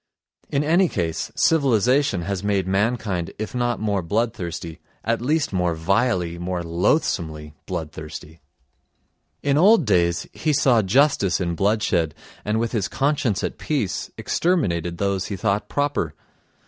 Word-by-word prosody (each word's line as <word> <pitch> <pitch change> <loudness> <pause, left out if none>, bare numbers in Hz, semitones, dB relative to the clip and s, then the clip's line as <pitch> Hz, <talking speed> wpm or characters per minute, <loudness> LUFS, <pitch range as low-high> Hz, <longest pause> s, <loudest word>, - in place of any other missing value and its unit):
In 140 0 +1
any 170 +4 +3
case 80 -3 -2
civilisation 130 - +3
has 100 +1 -3
made 100 -2 +1
mankind 100 -3 -1
if 110 0 -5
not 120 -1 0
more 105 -3 0
bloodthirsty, 85 -4 -3 0.2
at 115 +2 0
least 145 -1 0
more 90 -2 +1
vilely, 90 0 0
more 90 0 -3
loathsomely 85 - 0
bloodthirsty. 80 -2 -7 1.0
In 145 +1 +2
old 195 -2 +6
days 85 -5 +2
he 155 - 0
saw 130 -4 +4
justice 105 - +3
in 85 -2 -1
bloodshed 95 -4 +1 0.3
and 105 +1 0
with 115 0 -1
his 105 -5 0
conscience 135 -6 0
at - - -3
peace 135 -11 -2
exterminated 90 - 0
those 100 -1 -1
he 100 - -4
thought 100 +2 -1
proper. 145 - -1
100 Hz, 135 wpm, -23 LUFS, 85-125 Hz, 1.0 s, old